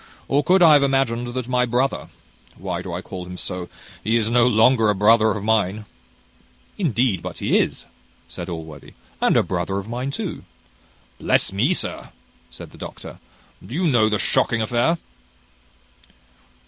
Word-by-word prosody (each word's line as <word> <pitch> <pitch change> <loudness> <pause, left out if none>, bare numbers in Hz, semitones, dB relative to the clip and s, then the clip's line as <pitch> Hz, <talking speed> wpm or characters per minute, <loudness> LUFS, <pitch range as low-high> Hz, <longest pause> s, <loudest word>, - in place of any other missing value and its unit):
or 145 +2 +2
could 185 0 +4
I 160 -2 +8
have 145 - +6
imagined 135 -3 +1
that 130 -2 -3
my 125 0 +1
brother 125 +3 -1 0.5
why 90 -1 -4
do 90 - -7
I 85 +2 -4
call 95 -3 -7
him 90 0 -8
so? 90 -1 -5 0.3
he 110 +3 +1
is 115 0 0
no 120 0 +4
longer 115 -1 +4
a 105 - +2
brother 110 +3 +4
of 105 -2 -2
mine 105 -1 0 0.4
" 60 0 -34
"Indeed 125 - +1
but - - -7
he - - +2
is," - - -2 0.4
said - - -7
Allworthy, 80 -4 -9 0.3
"and - - +3
a - - +4
brother 95 - -2
of 100 +1 -5
mine 125 +3 -3
too." 140 - -5 0.8
"Bless - - +1
me, 130 - +2
sir!" - - -3 0.4
said - - -12
the - - -15
doctor, - - -9 0.4
"do 125 - -8
you 180 +2 0
know 120 -8 +3
the 105 - +1
shocking 115 +3 +1
affair?" 120 +9 +1
115 Hz, 170 wpm, -22 LUFS, 95-130 Hz, 0.8 s, I